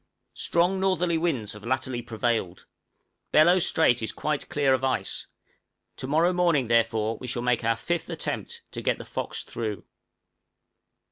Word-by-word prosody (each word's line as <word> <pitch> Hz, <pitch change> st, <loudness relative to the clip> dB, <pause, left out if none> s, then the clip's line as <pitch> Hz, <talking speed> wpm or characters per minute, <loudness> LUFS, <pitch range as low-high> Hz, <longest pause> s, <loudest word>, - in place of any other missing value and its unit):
Strong 180 Hz, +3 st, +1 dB
northerly 180 Hz, -3 st, +1 dB
winds 135 Hz, -11 st, -1 dB
have 105 Hz, 0 st, -12 dB
latterly 130 Hz, 0 st, -1 dB
prevailed; 115 Hz, -5 st, -2 dB, 0.7 s
Bellot 175 Hz, +4 st, +6 dB
Strait 125 Hz, -8 st, +3 dB
is 110 Hz, -, -2 dB
quite 150 Hz, -2 st, -2 dB
clear 140 Hz, -2 st, +2 dB
of 130 Hz, 0 st, 0 dB
ice; 130 Hz, -1 st, -1 dB, 0.7 s
to 130 Hz, -, -5 dB
morrow 165 Hz, +5 st, +3 dB
morning, 170 Hz, -9 st, +2 dB
therefore, 115 Hz, -1 st, +2 dB
we 125 Hz, -, -7 dB
shall 120 Hz, 0 st, -2 dB
make 125 Hz, -1 st, +1 dB
our 115 Hz, 0 st, +2 dB
fifth 175 Hz, +5 st, -2 dB
attempt -, -, -4 dB
to -, -, -5 dB
get -, -, +1 dB
the -, -, -9 dB
'Fox' -, -, -4 dB
through. 110 Hz, -4 st, -4 dB
130 Hz, 150 wpm, -26 LUFS, 115-165 Hz, 0.7 s, Bellot